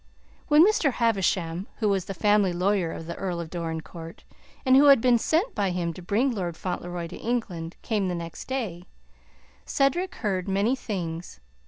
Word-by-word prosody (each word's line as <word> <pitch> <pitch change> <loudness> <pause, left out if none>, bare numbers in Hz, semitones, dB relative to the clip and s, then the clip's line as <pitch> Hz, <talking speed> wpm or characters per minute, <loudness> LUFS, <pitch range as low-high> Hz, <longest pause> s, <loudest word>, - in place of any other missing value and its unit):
When 305 +2 +7
Mr. 345 - +2
Havisham 190 -6 0
who 220 - 0
was 195 -3 +1
the 195 - -6
family 205 -2 +3
lawyer 180 -1 +1
of 165 - -7
the 170 - -5
Earl 180 -3 -3
of 165 -2 -6
Dorincourt, 165 -1 -6 0.4
and 260 0 +6
who 280 +2 +7
had 280 -3 +8
been 240 0 +4
sent 345 - +1
by 200 -2 0
him 175 -2 -2
to 180 - -10
bring 220 +9 +1
Lord 175 -6 -3
Fauntleroy 175 -1 -4
to 165 - -8
England 185 -9 -3
came 210 -4 0
the 180 - -1
next 170 -1 -7
day, 215 -10 -3 0.8
Cedric 350 +7 0
heard 190 -5 -2
many 200 +6 +2
things. 175 - -5
195 Hz, 175 wpm, -26 LUFS, 170-240 Hz, 0.8 s, had